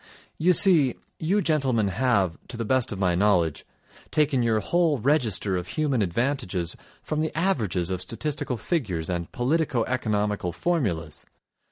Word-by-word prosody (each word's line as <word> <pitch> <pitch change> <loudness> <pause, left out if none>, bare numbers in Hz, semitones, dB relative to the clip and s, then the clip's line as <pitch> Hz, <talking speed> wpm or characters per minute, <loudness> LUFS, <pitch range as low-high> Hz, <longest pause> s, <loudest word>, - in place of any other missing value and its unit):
You 180 +3 +4
see, 165 - +6 0.2
you 190 +6 +1
gentlemen 130 -9 +1
have, 100 -5 +1
to 120 - -5
the 115 - -3
best 130 +2 +1
of 100 - -4
my 95 -2 +1
knowledge, 85 -5 +1 0.4
taken 145 -4 +1
your 115 -2 +2
whole 165 - +1
register 115 - +1
of 90 0 -5
human 140 - 0
advantages 100 - -1 0.3
from 155 0 -2
the 160 0 -3
averages 110 - 0
of 90 -1 -2
statistical 135 +5 -2
figures 95 - -2
and 85 -1 -4
politico 130 -1 0
economical 105 -7 -1
formulas. 85 - -2
120 Hz, 145 wpm, -25 LUFS, 95-150 Hz, 0.4 s, see